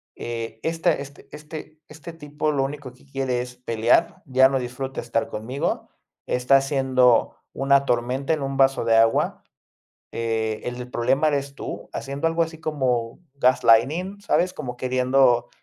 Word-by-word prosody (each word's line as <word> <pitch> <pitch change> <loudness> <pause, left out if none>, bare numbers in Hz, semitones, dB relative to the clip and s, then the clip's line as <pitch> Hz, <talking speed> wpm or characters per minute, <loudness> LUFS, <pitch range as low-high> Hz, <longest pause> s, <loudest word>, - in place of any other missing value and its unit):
eh, 115 -1 -6
esta 165 +1 +1
este 140 0 -8
este 155 0 -9
este 160 +2 -10
tipo 150 -1 -3
lo 140 -2 0
único 135 -2 -6
que 130 - -22
quiere 135 -3 -2
es 125 0 -9
pelear, 120 +7 +1
ya 130 -2 +5
no 135 - 0
disfruta 130 +2 -5
estar 115 -1 -1
conmigo, 125 +6 -3 0.4
está 125 +2 +3
haciendo 130 -3 +2 0.2
una 140 0 +3
tormenta 125 +4 -1
en 155 - -2
un 135 0 -3
vaso 135 -3 +3
de 115 -1 +4
agua, 115 0 +2 0.7
eh, 110 -1 -1
el 125 0 -4
del 125 0 -7
problema 135 +6 +2
eres 140 -1 -2
tú, - - -7
haciendo 140 +3 -3
algo 165 +1 +2
así 160 0 -5
como 125 -7 -1
gaslighting, 140 - +3
¿sabes? 185 -2 +1
Como 125 -5 -6
queriendo 125 -1 +2
135 Hz, 155 wpm, -23 LUFS, 125-145 Hz, 0.7 s, ya